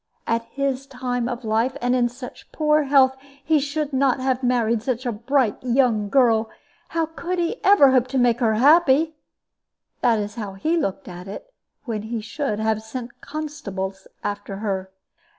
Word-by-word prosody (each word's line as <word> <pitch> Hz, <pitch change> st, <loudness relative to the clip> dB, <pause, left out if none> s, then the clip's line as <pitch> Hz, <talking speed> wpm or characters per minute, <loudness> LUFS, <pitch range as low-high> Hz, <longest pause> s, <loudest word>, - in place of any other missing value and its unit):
At 230 Hz, 0 st, 0 dB
his 275 Hz, +1 st, -3 dB
time 250 Hz, -2 st, -2 dB
of 245 Hz, -1 st, -5 dB
life, 225 Hz, +5 st, 0 dB
and 245 Hz, -1 st, +1 dB
in 240 Hz, -1 st, +2 dB
such 250 Hz, +1 st, -11 dB
poor 305 Hz, -1 st, +2 dB
health, 265 Hz, -1 st, +4 dB, 0.3 s
he 315 Hz, -1 st, +4 dB
should 290 Hz, +1 st, -3 dB
not 265 Hz, -1 st, +2 dB
have 260 Hz, -1 st, 0 dB
married 235 Hz, -2 st, +1 dB
a 250 Hz, -1 st, -1 dB
bright 235 Hz, +1 st, 0 dB
young 240 Hz, -5 st, +2 dB
girl: 230 Hz, -4 st, +3 dB, 0.4 s
how 330 Hz, -1 st, 0 dB
could 345 Hz, +3 st, -4 dB
he 345 Hz, +7 st, -2 dB
ever 380 Hz, -9 st, +7 dB
hope 255 Hz, -1 st, +3 dB
to 265 Hz, +1 st, -2 dB
make 245 Hz, -2 st, +3 dB
her 225 Hz, -3 st, +2 dB
happy? 305 Hz, +4 st, +5 dB, 0.9 s
That 230 Hz, -2 st, +3 dB
was 210 Hz, 0 st, -3 dB
how 210 Hz, -4 st, -6 dB
he 310 Hz, -, 0 dB
looked 195 Hz, -, -2 dB
at 180 Hz, 0 st, -9 dB
it, 355 Hz, -, -9 dB, 0.3 s
when 225 Hz, -4 st, -3 dB
he 225 Hz, +2 st, -4 dB
should 230 Hz, +1 st, -3 dB
have 220 Hz, 0 st, 0 dB
sent 235 Hz, +2 st, -8 dB
constables 225 Hz, -11 st, -5 dB, 0.2 s
after 205 Hz, -1 st, -4 dB
her." 195 Hz, -2 st, -3 dB
250 Hz, 170 wpm, -23 LUFS, 220-280 Hz, 0.9 s, ever